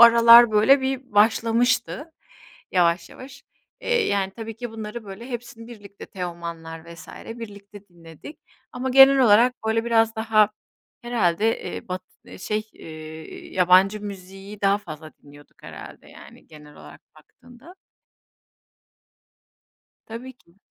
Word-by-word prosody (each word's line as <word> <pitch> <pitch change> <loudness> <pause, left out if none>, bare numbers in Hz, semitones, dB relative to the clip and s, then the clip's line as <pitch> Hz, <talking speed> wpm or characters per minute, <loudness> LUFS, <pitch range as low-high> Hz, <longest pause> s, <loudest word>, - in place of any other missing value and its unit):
aralar 235 0 +8
böyle 220 +6 +4
bir 265 -1 -4
başlamıştı, 235 +8 +1 0.6
yavaş 170 -1 +1
yavaş. 275 +1 -13 0.4
Eee, 480 -3 0
yani 195 -1 -1
tabii 225 0 -8
ki 240 0 -7
bunları 220 +1 -8
böyle 205 +5 -10
hepsini 230 -1 -8
birlikte, 205 -4 -13
Teoman'lar 170 -2 -8
vs. 160 -1 -14 0.3
birlikte 205 -2 -12
dinledik. 170 - -14 0.3
Ama 255 +1 -4
genel 270 +1 +7
olarak 240 +1 +5
böyle 225 +1 0
biraz 225 -1 +1
daha 215 -1 +2 0.5
herhâlde, 220 -3 0
eee, - - -7
batı 185 0 -10
şey, 215 +3 -4
eee, 155 0 -11
yabancı 185 +3 +4
müziği 195 0 -10
daha 200 0 +2
fazla 155 -5 -11
dinliyorduk 145 0 -19
herhâlde - - -12
yani, - - -16
genel 150 -1 -16
olarak - - -14 0.2
baktığında. 250 +8 -18 2.3
Tabii 235 +4 -9
ki. 185 -7 -30
210 Hz, 120 wpm, -23 LUFS, 180-235 Hz, 2.3 s, aralar